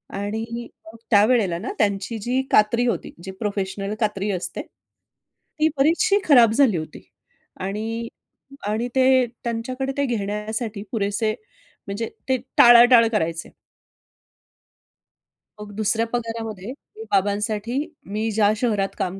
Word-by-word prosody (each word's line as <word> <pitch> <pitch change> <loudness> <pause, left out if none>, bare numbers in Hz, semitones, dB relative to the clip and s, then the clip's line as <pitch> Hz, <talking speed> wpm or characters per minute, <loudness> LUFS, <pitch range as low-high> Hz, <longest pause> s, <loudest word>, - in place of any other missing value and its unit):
आणि 225 +4 -4 0.2
मग 220 +1 -13
त्यावेळेला 210 -4 +4
ना 220 - -5
त्यांची 205 +2 0
जी 250 +5 0
कात्री 230 +3 +4
होती, 235 - -2
जी 190 - -6
प्रोफेशनल 200 -1 -3
कात्री 210 -2 -1
असते. 185 -2 -4
ती - - -22 0.8
बरीचशी 340 +9 +3
खराब 245 -8 +6
झाली 235 -5 +3
होती. 155 -1 -7 0.6
आणि, 220 +4 -4 0.6
आणि 220 +4 -1
ते 260 -1 +4 0.2
त्यांच्याकडे 255 +3 -3
ते 280 - +1
घेण्यासाठी 210 -1 -3
पुरेसे 215 0 0 0.5
म्हणजे 205 +3 -4 0.2
ते 260 - +3 0.2
टाळाटाळ 240 -1 +8
करायचे. 165 -6 -2 2.1
मग 210 -1 -9
दुसऱ्या 220 +2 +1
पगारामध्ये 225 -4 -4 0.3
मी 440 - -8
बाबांसाठी 210 +4 0 0.3
मी 215 +3 -2
ज्या 210 -1 +3
शहरात 210 -4 -1
काम 185 +1 -2
220 Hz, 115 wpm, -22 LUFS, 205-240 Hz, 2.1 s, टाळाटाळ